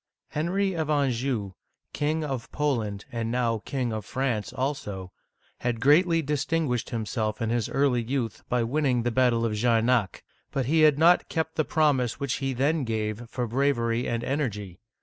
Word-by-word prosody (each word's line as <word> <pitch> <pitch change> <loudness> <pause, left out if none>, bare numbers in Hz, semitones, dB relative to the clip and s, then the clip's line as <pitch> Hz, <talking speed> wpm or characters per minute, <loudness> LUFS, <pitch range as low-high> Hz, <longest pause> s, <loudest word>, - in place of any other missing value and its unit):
Henry 190 +5 0
of 160 -3 -2
Anjou, 130 -7 0 0.4
King 155 +2 0
of 135 -5 -4
Poland, 115 -9 -1
and 115 -1 -2
now 115 -3 0
King 125 -4 -2
of 110 -1 -3
France 125 -2 -2
also, 105 -9 -3 0.5
had 120 -2 -1
greatly 165 +5 +4
distinguished 145 -3 -1
himself 110 -2 -2
in 115 0 -1
his 120 -2 0
early 135 -3 +2
youth 120 -2 -3
by 125 -1 +2
winning 125 -1 +1
the 120 - 0
battle 120 -2 +2
of 110 - -1
Jarnac'; 115 0 +2 0.3
but 135 -2 -1
he 160 +5 +3
had 150 -2 +6
not 170 +3 +4
kept 160 -1 -1
the 155 - +1
promise 145 -7 +1
which 140 -2 -1
he 135 0 0
then 140 +4 +1
gave 110 0 -3
for 125 -1 -2
bravery 120 -1 +1
and 115 0 -1
en 140 +4 -1
ergy. 105 - -4
125 Hz, 170 wpm, -26 LUFS, 115-145 Hz, 0.5 s, had